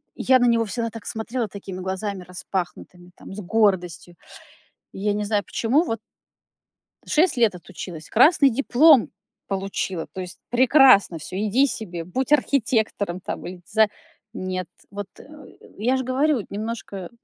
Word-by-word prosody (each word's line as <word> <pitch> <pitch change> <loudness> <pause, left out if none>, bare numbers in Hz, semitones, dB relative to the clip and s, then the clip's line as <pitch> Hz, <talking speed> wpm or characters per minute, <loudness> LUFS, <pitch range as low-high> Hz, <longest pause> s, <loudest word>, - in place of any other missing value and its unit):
я 260 -1 +4
на 245 - +3
него 230 -1 +3
всегда 230 +2 -3
так 225 -1 -10
смотрела 230 +1 -3
такими 190 -1 -8
глазами 190 +1 -4
распахнутыми, 180 0 -6
там, - - -11
с 210 - -7
гордостью. 180 -4 0 0.8
Я 205 +2 -1
не 210 0 -2
знаю 205 -1 0
почему, 265 +9 +1
вот 225 -9 -3 1.1
6 320 -3 +2
лет 225 -6 +3
отучилась, 170 -2 -9
красный 280 +3 +5
диплом 275 +2 +5 0.4
получила. 195 -3 -3
То 185 - -5
есть 180 -1 -9
прекрасно 255 - +5
всё, 180 - -8
иди 215 +7 +2
себе, 175 -9 -5
будь 255 - -3
архитектором 220 -9 +1
там - - -6
или 180 0 -9
диза 220 +1 +3 0.5
Нет. 185 -3 -4 0.2
Вот, 205 -1 -6
э, - - -12 0.6
я 250 +4 +1
ж 260 - -2
говорю, 260 -1 +1
немножко 205 -3 -5
210 Hz, 145 wpm, -23 LUFS, 185-245 Hz, 1.1 s, красный